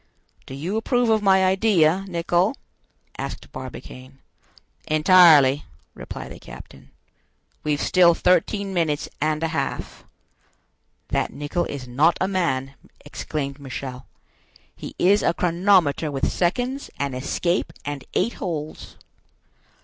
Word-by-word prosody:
"Do 135 Hz, -, -7 dB
you 175 Hz, +10 st, -3 dB
approve 245 Hz, 0 st, +1 dB
of 220 Hz, -1 st, +3 dB
my 190 Hz, -2 st, +4 dB
idea, 190 Hz, -2 st, +3 dB
Nicholl?" 175 Hz, +5 st, 0 dB, 0.6 s
asked -, -, -6 dB
Barbicane. 130 Hz, +1 st, -10 dB, 0.7 s
"Entirely," 155 Hz, -4 st, +6 dB, 0.3 s
replied -, -, -8 dB
the -, -, -10 dB
captain. 70 Hz, 0 st, -13 dB, 0.7 s
"We've 150 Hz, -1 st, 0 dB
still 175 Hz, -2 st, +4 dB
thirteen 190 Hz, +3 st, +1 dB
minutes 160 Hz, -5 st, 0 dB
and 155 Hz, +1 st, 0 dB
a 165 Hz, -, 0 dB
half." 160 Hz, -, -4 dB, 1.1 s
"That -, -, -1 dB
Nicholl 145 Hz, +6 st, -2 dB
is 135 Hz, -3 st, -6 dB
not 150 Hz, +7 st, +2 dB
a 185 Hz, -, +1 dB
man," 135 Hz, -9 st, -1 dB, 0.3 s
exclaimed 145 Hz, -1 st, -5 dB
Michel; 130 Hz, -1 st, -7 dB, 0.7 s
"he -, -, -9 dB
is 200 Hz, +3 st, +4 dB
a 170 Hz, -, +1 dB
chronometer 175 Hz, -3 st, +2 dB
with 135 Hz, -2 st, -1 dB
seconds, 250 Hz, +10 st, -1 dB
an 140 Hz, -1 st, -2 dB
escape, 170 Hz, +7 st, -1 dB
and 145 Hz, -2 st, -5 dB
eight 230 Hz, +6 st, +1 dB
holes." 155 Hz, -5 st, -5 dB
165 Hz, 120 wpm, -23 LUFS, 140-185 Hz, 1.1 s, Entirely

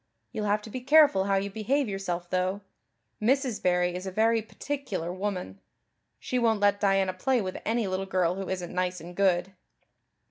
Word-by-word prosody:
You'll 210 Hz, -, -3 dB
have 210 Hz, +1 st, +1 dB
to 220 Hz, -, -10 dB
be 255 Hz, -, -5 dB
careful 285 Hz, -7 st, +5 dB
how 195 Hz, 0 st, +2 dB
you 200 Hz, +1 st, -1 dB
behave 250 Hz, +7 st, 0 dB
yourself, 180 Hz, -3 st, -3 dB
though. 185 Hz, +2 st, 0 dB, 0.6 s
Mrs. 255 Hz, 0 st, +1 dB
Barry 180 Hz, -1 st, +2 dB
is 180 Hz, +2 st, -5 dB
a -, -, -3 dB
very 225 Hz, +3 st, +2 dB
particular 215 Hz, -, -4 dB
woman. 185 Hz, -, -4 dB, 0.6 s
She 250 Hz, -, -2 dB
won't 225 Hz, -3 st, +2 dB
let 205 Hz, 0 st, +2 dB
Diana 195 Hz, -2 st, +2 dB
play 250 Hz, +8 st, +1 dB
with 185 Hz, -3 st, -4 dB
any 230 Hz, 0 st, +1 dB
little 190 Hz, 0 st, -2 dB
girl 180 Hz, -2 st, +1 dB
who 195 Hz, 0 st, -5 dB
isn't 180 Hz, -2 st, -4 dB
nice 180 Hz, 0 st, -1 dB
and 175 Hz, +2 st, -10 dB
good." 190 Hz, -1 st, +2 dB
195 Hz, 180 wpm, -28 LUFS, 185-220 Hz, 0.6 s, careful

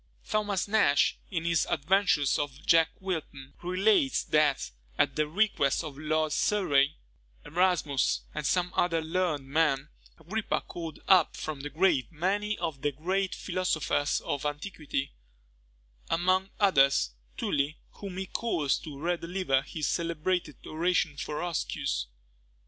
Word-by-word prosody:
Thomas 205 Hz, -3 st, 0 dB
Nash, 200 Hz, -9 st, +3 dB
in 165 Hz, -3 st, -3 dB
his 165 Hz, -1 st, +2 dB
Adventures 170 Hz, -3 st, +2 dB
of 145 Hz, 0 st, -4 dB
Jack 165 Hz, -1 st, +5 dB
Wilton, 155 Hz, -8 st, -5 dB
relates, 200 Hz, +9 st, +2 dB
that, 150 Hz, -3 st, +2 dB, 0.3 s
at 135 Hz, -, +2 dB
the 155 Hz, -1 st, +1 dB
request 160 Hz, -6 st, +1 dB
of 150 Hz, -3 st, -7 dB
Lord 155 Hz, +1 st, 0 dB
Surrey, 150 Hz, -8 st, +2 dB, 0.5 s
Erasmus, 170 Hz, -5 st, +1 dB
and 150 Hz, -, -4 dB
some 180 Hz, +4 st, +1 dB
other 170 Hz, -2 st, +2 dB
learned 160 Hz, -4 st, -1 dB
men, 140 Hz, -1 st, +1 dB, 0.3 s
Agrippa 200 Hz, +7 st, -2 dB
called 165 Hz, -3 st, -8 dB
up 185 Hz, -4 st, +5 dB
from 155 Hz, -2 st, -4 dB
the 145 Hz, -, -5 dB
grave 155 Hz, -6 st, +2 dB
many 200 Hz, +6 st, -1 dB
of 160 Hz, -6 st, -4 dB
the 145 Hz, -, +1 dB
great 185 Hz, +7 st, -1 dB
philosophers 175 Hz, -6 st, 0 dB
of 140 Hz, -, -3 dB
antiquity; 150 Hz, -2 st, -3 dB, 1.0 s
among 185 Hz, +3 st, +2 dB
others, 140 Hz, -, +4 dB, 0.3 s
Tully, 145 Hz, +2 st, 0 dB
whom 195 Hz, -3 st, -8 dB
he 190 Hz, -, -2 dB
caused 170 Hz, -10 st, -1 dB
to 150 Hz, -3 st, -8 dB
re 175 Hz, +3 st, 0 dB
deliver 170 Hz, -6 st, 0 dB
his 155 Hz, +2 st, -4 dB
celebrated 170 Hz, -3 st, -1 dB
oration 165 Hz, -1 st, 0 dB
for 150 Hz, -, -5 dB
Roscius. -, -, -2 dB
165 Hz, 130 wpm, -29 LUFS, 145-185 Hz, 1.0 s, Jack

